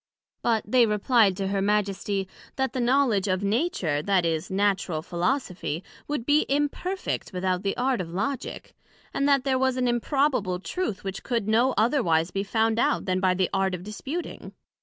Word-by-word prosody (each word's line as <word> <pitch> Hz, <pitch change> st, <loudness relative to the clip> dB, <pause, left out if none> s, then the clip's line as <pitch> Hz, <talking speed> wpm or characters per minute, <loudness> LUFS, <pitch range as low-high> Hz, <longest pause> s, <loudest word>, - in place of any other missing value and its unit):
But 225 Hz, -3 st, +1 dB
they 240 Hz, +2 st, +4 dB
replied 210 Hz, -2 st, +3 dB
to 195 Hz, -1 st, -2 dB
her 195 Hz, 0 st, 0 dB
Majesty, 200 Hz, -1 st, 0 dB, 0.3 s
That 265 Hz, 0 st, -1 dB
the 255 Hz, -, -2 dB
knowledg 240 Hz, -5 st, +2 dB
of 185 Hz, +1 st, -1 dB
Nature, 200 Hz, -, 0 dB
that 190 Hz, 0 st, +2 dB
is, 160 Hz, -1 st, -1 dB
Natural 190 Hz, -5 st, 0 dB
Philosophy, 180 Hz, -, -2 dB, 0.2 s
would 290 Hz, -6 st, -3 dB
be 295 Hz, +2 st, +3 dB
imperfect 295 Hz, +7 st, -2 dB
without 185 Hz, -1 st, -1 dB
the 195 Hz, 0 st, -2 dB
Art 250 Hz, -3 st, +1 dB
of 175 Hz, -, -5 dB
Logick; 210 Hz, +11 st, -4 dB, 0.4 s
and 280 Hz, +1 st, +1 dB
that 275 Hz, -2 st, +4 dB
there 265 Hz, -1 st, +1 dB
was 260 Hz, -1 st, +1 dB
an 250 Hz, -1 st, +1 dB
improbable 240 Hz, -6 st, +1 dB
Truth 225 Hz, -, -3 dB
which 195 Hz, -1 st, -5 dB
could 235 Hz, -5 st, -2 dB
no 235 Hz, +4 st, +3 dB
otherwise 185 Hz, -, +2 dB
be 195 Hz, +1 st, -1 dB
found 225 Hz, +2 st, +1 dB
out -, -, +1 dB
then 185 Hz, -1 st, 0 dB
by 185 Hz, -1 st, +2 dB
the 185 Hz, -1 st, 0 dB
Art 190 Hz, -1 st, +1 dB
of 180 Hz, -, -9 dB
disputing. 270 Hz, -, -6 dB
210 Hz, 175 wpm, -26 LUFS, 190-260 Hz, 0.4 s, they